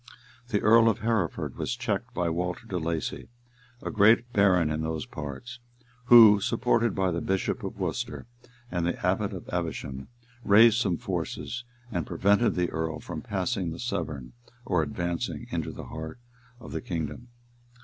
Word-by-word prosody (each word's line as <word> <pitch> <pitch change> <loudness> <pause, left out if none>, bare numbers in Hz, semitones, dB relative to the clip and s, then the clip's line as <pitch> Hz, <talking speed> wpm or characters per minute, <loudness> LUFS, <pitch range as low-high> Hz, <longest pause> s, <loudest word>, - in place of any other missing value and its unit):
The 105 -4 0
Earl 115 +1 +6
of 105 - -1
Hereford 110 -7 -1
was 125 - -2
checked 115 0 -2
by 90 -2 0
Walter 90 +5 -2
de 95 -5 -3
Lacy, 80 -1 -3 0.5
a - - -3
great 115 +3 +4
baron 90 -6 +4
in 75 +1 -1
those 80 -1 -3
parts, 75 - -7 0.5
who, 115 -4 +9
supported 115 +1 +1
by 95 -1 +1
the 85 0 -2
bishop 95 0 -1
of - - -5
Worcester - - -3 0.5
and 90 -1 -1
the 85 - -1
abbot 95 +3 +1
of 95 -3 -8
Evesham, 75 -6 -4 0.4
raised 110 +3 +6
some 95 -7 +1
forces, 125 0 -4 0.3
and 85 -7 -2
prevented 105 +4 +2
the 90 -1 0
earl 80 -1 -2
from 80 -2 -6
passing 95 -2 -2
the 80 - -6
Severn, 75 - -4 0.3
or 90 -7 +2
advancing 85 +3 -3
into - - -2
the - - -8
heart 80 +3 -7 0.4
of - - -10
the - - -3
kingdom. 80 +6 -4
95 Hz, 160 wpm, -27 LUFS, 80-110 Hz, 0.5 s, who